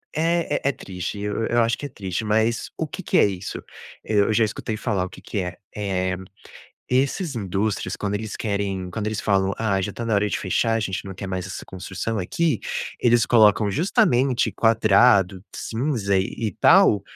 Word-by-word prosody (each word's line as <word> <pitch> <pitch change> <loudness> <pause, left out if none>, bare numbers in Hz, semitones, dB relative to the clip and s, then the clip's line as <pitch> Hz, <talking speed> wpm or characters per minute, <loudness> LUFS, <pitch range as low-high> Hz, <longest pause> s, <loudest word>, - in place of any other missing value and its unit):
é 165 +1 +1
é - - +5
é - - +2
triste, 95 -2 -6
eu 105 +2 -2
eu 120 0 +2
acho 115 +1 0
que 145 - -6
é - - -5
triste, 95 -1 -4
mas 110 +2 +1
o - - -2
que - - -7
que - - +1
é - - +6
isso? 95 -1 -4 0.4
Eu 105 0 +2
já 110 - +4
escutei 110 +1 -4
falar 95 -3 -1
o - - -8
que - - -13
que 105 - -4
é. 90 -1 -4 0.2
Eh, 95 -3 -1 0.7
esses 140 +5 0
indústrias, 100 0 -2
quando 100 0 -2
eles 110 0 -4
querem 100 -4 -2
quando 105 +3 -4
eles 110 -1 -2
falam: 95 -1 +1
"Ah, 100 -4 0
já 100 - -2
está 115 - -6
na 115 - 0
hora 105 +1 +2
de - - -1
fechar, 115 +4 +1
a 115 - +1
gente 95 -1 -3
não 95 - -7
quer 100 +2 -6
mais 95 0 -3
essa 95 - -7
construção 95 +4 -4
aqui". 155 - 0 0.4
Eles 120 -1 +4
colocam 105 -3 +4
justamente 135 - +2
quadrado, 105 -4 +4
cinza 115 -5 -1
e 95 - +1 0.2
e - - -4
tal, 170 - +6
105 Hz, 195 wpm, -23 LUFS, 95-115 Hz, 0.7 s, é